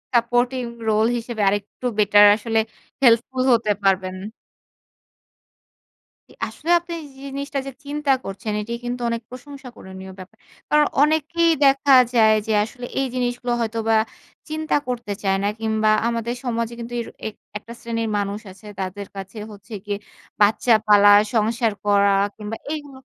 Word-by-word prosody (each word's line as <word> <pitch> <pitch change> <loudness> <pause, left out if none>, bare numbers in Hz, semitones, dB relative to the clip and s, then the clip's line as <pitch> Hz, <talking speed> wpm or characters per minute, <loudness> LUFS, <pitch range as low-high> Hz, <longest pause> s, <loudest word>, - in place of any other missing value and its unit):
supporting 245 +2 +1 0.2
role 215 +1 +3
হিসেবে 230 -1 -5
আরেকটু 205 +5 -2
better 205 0 +6
আসলে 225 +1 -1 0.4
হেল্পফুল 255 +2 +3
হতে 225 -2 +2
পারবেন। 190 -1 +1 2.1
জি। - - -18 0.2
আসলে 325 - -8
আপনি 345 0 -8 0.2
জি - - -16
জিনিসটা 280 +1 -4
যে - - -4
চিন্তা 290 0 -1
করছেন 195 +2 -5
এটি 225 +3 -5
কিন্তু 245 0 -4
অনেক 230 0 -2
প্রশংসনীয় 245 -8 -11
ব্যাপার। 190 +4 -12 0.3
কারণ 300 0 +4 0.2
অনেকেই 315 +3 +2
দেখা 275 0 +4 0.2
যায় 220 -2 +6
যে - - 0
আসলে 245 +3 -8
এই 270 - +1
জিনিসগুলো 245 -1 -1
হয়তোবা 225 0 0 0.5
চিন্তা 315 0 -1
করতে 235 -4 -3
চায় 195 -1 +2
না - - +1
কিংবা 220 -1 +1 0.2
আমাদের 235 0 -2
সমাজে 235 -2 -2
কিন্তু 235 +1 -7
এর - - -8 0.2
এক 220 - -7 0.2
একটা 230 +3 -11
শ্রেণীর 230 -1 -3
মানুষ 200 0 -2
আছে 195 +3 -17
তাদের 190 +1 -5
কাছে 195 +3 -8
হচ্ছে 205 +2 -13
গিয়ে 205 -1 -2 0.4
বাচ্চা 215 +3 +4
পালা, 205 -1 +7 0.2
সংসার 225 0 +1
করা, 200 -1 +4 0.3
কিংবা 215 +1 -6
এইগুলো 290 -3 -6
230 Hz, 145 wpm, -22 LUFS, 210-255 Hz, 2.1 s, পালা